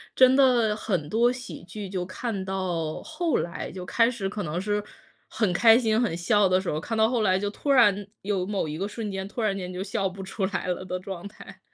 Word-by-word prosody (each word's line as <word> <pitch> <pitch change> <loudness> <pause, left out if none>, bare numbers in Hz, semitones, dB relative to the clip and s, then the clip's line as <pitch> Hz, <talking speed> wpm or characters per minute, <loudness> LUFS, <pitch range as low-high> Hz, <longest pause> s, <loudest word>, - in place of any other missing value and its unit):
真 260 0 +6
的 245 -6 +4
很 180 -8 -2
多 235 +4 +3
喜 250 -7 -8
剧 205 +2 -7
就 185 -1 -3
看 195 +1 -4
到 180 -5 -2
后 320 +1 -1
来 170 - -4
就 180 -1 -7
开 230 +5 +3
始 230 -6 -3
可 205 0 -4
能 165 +2 -3
是 205 +1 -1 0.5
很 215 -5 0
开 225 +4 +7
心、 225 -1 +2
很 210 -9 0
笑 195 +2 +3
的 185 0 +4
时 185 - -4
候， 150 - -1
看 225 +7 -4
到 220 +1 +4
后 240 -3 +1
来 185 -3 +3
就 205 +1 -1
突 280 +7 -2
然 205 -6 +5 0.2
有 195 -2 -1
某 195 -5 -2
一 150 - -4
个 195 +4 -2
瞬 215 0 -5
间， 190 0 -4
突 230 - -5
然 205 -3 +1
间 180 -1 -5
就 180 +1 -5
笑 195 -2 -1
不 195 +1 -9
出 190 +1 -2
来 185 -2 -3
了 180 +1 -2
的 185 0 -4
状 185 -1 -7
态。 195 -2 -13
200 Hz, 255 characters per minute, -26 LUFS, 185-225 Hz, 0.5 s, 开